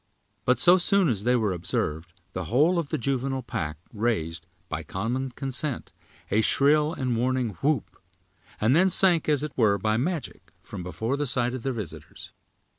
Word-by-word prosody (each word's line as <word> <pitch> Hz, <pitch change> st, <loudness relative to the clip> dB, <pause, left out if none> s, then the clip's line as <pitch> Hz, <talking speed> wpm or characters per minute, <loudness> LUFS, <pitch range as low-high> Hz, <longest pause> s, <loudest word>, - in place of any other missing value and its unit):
But 125 Hz, -, +3 dB
so 180 Hz, +1 st, +6 dB
soon 190 Hz, -1 st, +3 dB
as 105 Hz, -3 st, -2 dB
they 125 Hz, +1 st, +3 dB
were 110 Hz, -5 st, +1 dB
observed 85 Hz, -1 st, -3 dB, 0.2 s
the 95 Hz, -1 st, -4 dB
whole 150 Hz, -, +3 dB
of 155 Hz, -4 st, -4 dB
the -, -, -1 dB
juvenile 135 Hz, +1 st, -2 dB
pack 75 Hz, -9 st, -4 dB, 0.2 s
raised, 105 Hz, -7 st, -2 dB, 0.2 s
by -, -, -4 dB
common 120 Hz, +7 st, -3 dB
consent, 135 Hz, +2 st, -3 dB, 0.4 s
a 110 Hz, -, +3 dB
shrill 150 Hz, +6 st, +3 dB
and 130 Hz, -7 st, -2 dB
warning 125 Hz, 0 st, 0 dB
whoop; 140 Hz, -9 st, -1 dB, 0.6 s
and 115 Hz, +6 st, +3 dB
then 185 Hz, +3 st, +5 dB
sank, 175 Hz, -3 st, +4 dB
as 150 Hz, -1 st, +2 dB
it 150 Hz, -, -5 dB
were, 105 Hz, -4 st, +3 dB
by 110 Hz, +3 st, 0 dB
magic, 160 Hz, +5 st, -4 dB
from -, -, -8 dB
before 100 Hz, +10 st, -3 dB
the 145 Hz, 0 st, -1 dB
sight 125 Hz, -1 st, +1 dB
of 130 Hz, -, -5 dB
their 135 Hz, -, -2 dB
visitors. 105 Hz, -8 st, -8 dB
125 Hz, 175 wpm, -26 LUFS, 110-145 Hz, 0.6 s, so